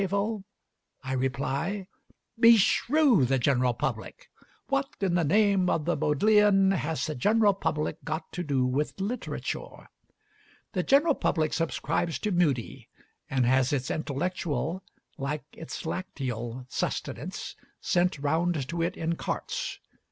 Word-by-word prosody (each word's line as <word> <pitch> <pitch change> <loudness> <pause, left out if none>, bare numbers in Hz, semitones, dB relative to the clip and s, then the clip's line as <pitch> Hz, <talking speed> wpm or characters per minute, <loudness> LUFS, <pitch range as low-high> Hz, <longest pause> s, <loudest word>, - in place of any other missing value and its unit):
I 130 0 -3
reply, 140 +9 -1 0.5
Beshrew 230 - +5
the 135 +2 +2
general 125 -1 +2
public! - - -4 0.4
What 275 0 0
in 195 -3 0
the 175 -1 +2
name 195 +2 +3
of 150 - 0
the 175 - +1
Bodleian 195 +4 +4
has 160 -4 -1
the 155 - -3
general 210 - +3
public 155 -5 -2
got 160 +1 -4
to 180 - -4
do 135 -5 +1
with 140 +8 -1
literature? 215 +6 -4 0.8
The 185 - +1
general 290 - +4
public 155 - 0
subscribes 165 0 -1
to 210 - -2
Mudie, 150 -10 0 0.4
and 130 -2 +1
has 130 +1 +3
its 135 -2 -1
intellectual, 160 +2 -2 0.4
like 140 +1 -3
its 165 - -7
lacteal 125 -8 -4
sustenance, - - -4 0.2
sent 180 -1 +1
round 155 0 0
to 170 0 -2
it 170 - -1
in 165 +1 -1
carts. - - -3
165 Hz, 125 wpm, -28 LUFS, 140-195 Hz, 0.8 s, Beshrew